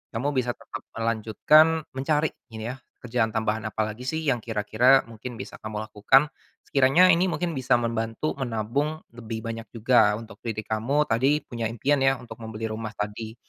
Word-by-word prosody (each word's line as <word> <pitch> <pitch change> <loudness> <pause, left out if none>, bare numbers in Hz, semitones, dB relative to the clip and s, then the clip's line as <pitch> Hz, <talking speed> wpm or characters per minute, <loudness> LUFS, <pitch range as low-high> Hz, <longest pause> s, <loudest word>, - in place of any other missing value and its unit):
kamu 140 +6 0
bisa 125 -2 -1
tetap 115 - -8 0.2
melanjutkan, 115 +9 +3
mencari, 150 +3 0 0.2
ini 115 0 -6
ya, - - -7 0.3
kerjaan 115 -2 0
tambahan 110 0 -1
apa 110 +1 -1
lagi 125 +4 -9
sih 160 +3 -2
yang 135 -5 +1
kira-kira, 115 +4 +3
mungkin 115 +2 -9
bisa 130 +3 -9
kamu 110 0 -5
lakukan. 130 +7 +3 0.3
Sekiranya 140 +7 +5
ini 175 +2 +3
mungkin 175 -1 -1
bisa 130 -4 +1
membantu 115 +3 -1
menabung, 135 +6 -2
lebih 115 -1 -7
banyak 115 0 -5
juga, 115 -2 +4
untuk 110 -1 -10
diri 110 -2 -4
kamu, 120 +8 +1
tadi, 135 +6 +2
punya 115 -2 -3
impian 135 +6 +1
ya, 135 0 +3
untuk 125 -2 -11
membeli 110 0 -5
rumah 110 0 -5
tadi. 110 +2 -5
115 Hz, 170 wpm, -25 LUFS, 110-135 Hz, 0.3 s, Sekiranya